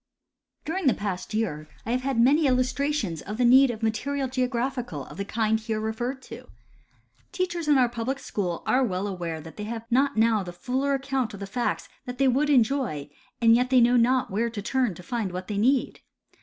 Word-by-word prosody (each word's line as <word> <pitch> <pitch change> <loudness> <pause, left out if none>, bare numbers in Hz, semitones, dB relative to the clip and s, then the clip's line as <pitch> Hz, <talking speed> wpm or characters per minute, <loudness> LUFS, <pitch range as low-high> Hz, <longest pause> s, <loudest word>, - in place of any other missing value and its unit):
During 335 0 -1
the 255 - +4
past 190 -3 -4
year, 165 -9 -2 0.2
I 225 - -2
have 250 +1 +1
had 265 -2 -1
many 285 +6 +5
illustrations 255 - 0
of 210 +2 -6
the 250 - +2
need 260 +2 +7
of 225 -2 -5
material 270 +6 -1
of 255 - -6
geographical 250 - -2
of - - -12
the 200 - -3
kind 220 +1 0
here 220 0 -3
referred 240 +5 -3
to. - - -10 0.8
Teachers 350 -3 -2
in 295 -2 +5
our 250 -2 +4
pul 235 -1 -5
ilic 265 +2 -1
schools 180 -9 -3
are 260 +1 +3
well 190 -4 -1
aware 175 -5 -4
that 160 +1 -12
they 210 - -5
have 225 +1 -5
not 275 +1 +2
now 220 -1 +3
the 180 -2 -6
fuller 260 +9 -1
account 265 -5 -2
of - - -10
the 200 - -5
facts 235 +5 -2 0.2
that 250 0 -6
they 275 - +2
Avould 265 +3 +3
enjo}^; 245 - +1 0.3
and 230 0 +7
yet 250 +1 +1
they 255 -1 +5
know 240 +1 +5
not 250 0 +3
where 225 +4 0
to 220 -3 -6
turn 250 -4 0
to 180 - -11
find 220 -1 -3
what 185 +1 -6
they 205 -2 -2
need. 255 +4 +1
235 Hz, 215 wpm, -26 LUFS, 210-265 Hz, 0.8 s, need